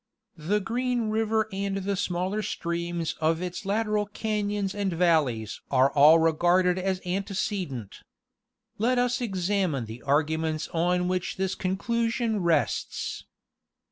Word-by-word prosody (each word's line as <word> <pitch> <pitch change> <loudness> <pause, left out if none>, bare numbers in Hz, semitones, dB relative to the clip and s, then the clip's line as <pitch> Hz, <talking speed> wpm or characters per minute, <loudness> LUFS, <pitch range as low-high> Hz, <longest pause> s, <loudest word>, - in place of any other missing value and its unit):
* - - -52 0.2
The 210 - +4
Green 240 +1 -1
river 220 0 +1
and 195 0 -2
the 195 +1 -1
smaller 185 +2 -1
streams 170 -3 -3
of 160 +1 +2
its 180 +2 -5
lateral 210 0 0
cations 205 -2 -2
and 200 -2 -1
valleys 155 - +1
are 135 0 +4
all 150 +3 +7
regarded 175 +3 +3
as 190 0 -1
antecedent. 185 - -3 0.8
Let 245 +4 +2
us 245 0 +1
examine 190 - 0
the 110 +2 -9
argu 155 +3 +1
ments 155 -1 -2
on 180 +2 +1
which 185 -1 -2
this 190 0 -1
conclusion 230 +4 -1
rests. 170 -2 -1
185 Hz, 130 wpm, -27 LUFS, 165-210 Hz, 0.8 s, all